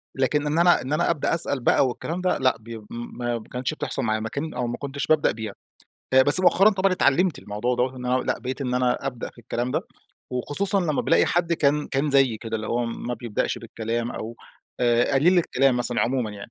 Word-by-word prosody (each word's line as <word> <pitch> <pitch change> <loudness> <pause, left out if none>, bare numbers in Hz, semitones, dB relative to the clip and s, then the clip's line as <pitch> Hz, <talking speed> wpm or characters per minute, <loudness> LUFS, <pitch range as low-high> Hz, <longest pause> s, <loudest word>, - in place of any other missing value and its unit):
لكن 145 +3 0
إن 155 +3 0
أنا 175 -5 +4
إن 130 +4 -4
أنا 170 +3 +1
أبدأ 165 -2 0
أسأل 150 -5 +1
بقى 130 +2 +3
والكلام 165 +8 -4
ده 185 - +1
لأ 130 -3 +1
بي 115 0 -9
ما 120 0 -4
ب 110 - -11
كانتش 125 +4 -3
بتحصل 145 -5 -4
معايا 110 -1 0
ما 110 0 -4
كان 155 +3 -5
أو 125 -1 -2
ما 120 - -4
كنتش 140 0 -5
بابدأ 155 -1 +3
بيها. 110 -1 -6 0.6
آآ 130 0 +7
بس 145 +7 +9
مؤخرًا 195 +3 +5
طبعًا 195 -1 +1
اتعلمت 180 0 +2
الموضوع 105 +5 -2
دَوَّة 130 +1 -1
إن 125 0 -6
أنا 125 0 +1
لأ - - -2
بقيت 130 +3 -5
إن 125 -2 -2
أنا 125 +2 0
أبدأ 125 -3 -5
في - - -26
الكلام 120 +2 -3
ده، - - 0 0.5
وخصوصًا 190 - -1
لما 155 -5 -1
بالاقي - - +3
حد 170 -1 0
كان 150 -2 +1
كان 140 +2 -1
زيي 135 -5 +3
كده 115 -1 -4
اللي 110 0 -6
هو 120 +1 -1
ما 120 +1 -4
بيبدأش 115 -4 -3
بالكلام 115 +2 -4
أو 115 +2 -7 0.4
آآ 120 +2 +2
قليل 175 +7 +4
الكلام 135 -5 +2
مثلًا 120 0 0
عمومًا 125 -3 0
يعني 100 +2 -10
130 Hz, 220 wpm, -24 LUFS, 120-150 Hz, 0.6 s, بس